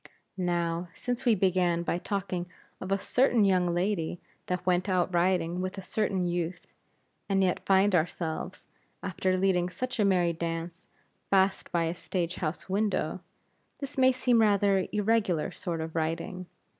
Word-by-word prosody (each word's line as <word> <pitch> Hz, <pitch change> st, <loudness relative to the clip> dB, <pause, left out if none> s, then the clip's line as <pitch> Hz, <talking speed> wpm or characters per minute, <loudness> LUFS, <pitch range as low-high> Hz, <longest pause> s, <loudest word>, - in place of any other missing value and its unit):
Now, 175 Hz, -1 st, -1 dB
since 245 Hz, +1 st, -3 dB
we 235 Hz, -3 st, +5 dB
began 180 Hz, -3 st, +2 dB
by 175 Hz, -, -1 dB
talking 185 Hz, -2 st, -3 dB, 0.3 s
of 185 Hz, -, -6 dB
a 195 Hz, -, +3 dB
certain 245 Hz, +1 st, +3 dB
young 185 Hz, -2 st, +3 dB
lady 175 Hz, -1 st, -1 dB, 0.3 s
that 180 Hz, 0 st, -2 dB
went 180 Hz, +1 st, +1 dB
out 185 Hz, -1 st, +1 dB
riding 175 Hz, 0 st, +1 dB
with 185 Hz, +2 st, -4 dB
a 195 Hz, -, -6 dB
certain 190 Hz, -2 st, 0 dB
youth; 175 Hz, 0 st, -2 dB, 0.6 s
and 195 Hz, -1 st, +3 dB
yet 180 Hz, -1 st, 0 dB
find 195 Hz, +1 st, +4 dB
ourselves, 165 Hz, -1 st, -2 dB, 0.4 s
after 185 Hz, 0 st, 0 dB
leading 185 Hz, -2 st, +2 dB
such 255 Hz, +6 st, -4 dB
a -, -, +4 dB
merry 180 Hz, -3 st, +3 dB
dance, 165 Hz, +1 st, -5 dB, 0.4 s
fast 190 Hz, 0 st, +2 dB
by 170 Hz, -1 st, +1 dB
a 165 Hz, 0 st, -1 dB
stage 175 Hz, 0 st, -3 dB
house 160 Hz, -1 st, -3 dB
window; 205 Hz, +2 st, -1 dB, 0.6 s
this 280 Hz, 0 st, -6 dB
may 260 Hz, -1 st, +5 dB
seem 250 Hz, -2 st, +2 dB
rather 200 Hz, -2 st, +3 dB
irregular 210 Hz, -5 st, +1 dB
sort 170 Hz, -2 st, -4 dB
of 160 Hz, +1 st, -6 dB
writing. 165 Hz, +3 st, -2 dB
185 Hz, 155 wpm, -29 LUFS, 175-200 Hz, 0.6 s, we